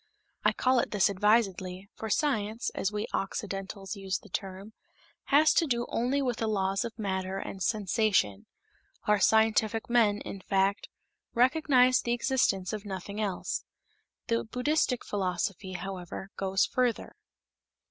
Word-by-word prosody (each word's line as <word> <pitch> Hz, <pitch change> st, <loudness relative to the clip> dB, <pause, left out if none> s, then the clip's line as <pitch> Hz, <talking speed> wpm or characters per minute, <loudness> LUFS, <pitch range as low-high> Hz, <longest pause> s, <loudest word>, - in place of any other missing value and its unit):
I -, -, +4 dB
call 255 Hz, 0 st, +2 dB
it -, -, 0 dB
this 205 Hz, -1 st, +3 dB
advisedly, 195 Hz, -2 st, +1 dB
for 220 Hz, -, -6 dB
science, 220 Hz, -3 st, 0 dB
as 195 Hz, -, -1 dB
we 210 Hz, 0 st, -2 dB
Occidentals 195 Hz, 0 st, -4 dB
use 195 Hz, -1 st, -2 dB
the -, -, -16 dB
term, 195 Hz, +2 st, -5 dB, 0.5 s
has 300 Hz, +2 st, +5 dB
to 330 Hz, -, +3 dB
do 240 Hz, -2 st, 0 dB
only 265 Hz, +4 st, 0 dB
with 245 Hz, -3 st, -1 dB
the 225 Hz, -, -1 dB
laws 195 Hz, -2 st, 0 dB
of 230 Hz, -1 st, -6 dB
matter 190 Hz, -2 st, -2 dB
and 195 Hz, 0 st, -6 dB
sensation; 195 Hz, -, +1 dB, 0.6 s
our 210 Hz, -1 st, +3 dB
scientific 220 Hz, +2 st, +3 dB
men, 220 Hz, -4 st, +4 dB
in 195 Hz, -, -7 dB
fact, 195 Hz, +1 st, 0 dB, 0.5 s
recognize 255 Hz, 0 st, +4 dB
the 235 Hz, -, 0 dB
existence 235 Hz, -7 st, +1 dB
of 210 Hz, -2 st, -4 dB
nothing 200 Hz, +1 st, -5 dB
else. 195 Hz, -4 st, -2 dB, 0.6 s
The 230 Hz, 0 st, 0 dB
Buddhistic 250 Hz, +2 st, 0 dB
philosophy, 190 Hz, -1 st, -2 dB
however, 185 Hz, +1 st, -6 dB
goes 195 Hz, 0 st, +1 dB
further. 250 Hz, -2 st, -1 dB
210 Hz, 135 wpm, -29 LUFS, 195-235 Hz, 0.6 s, has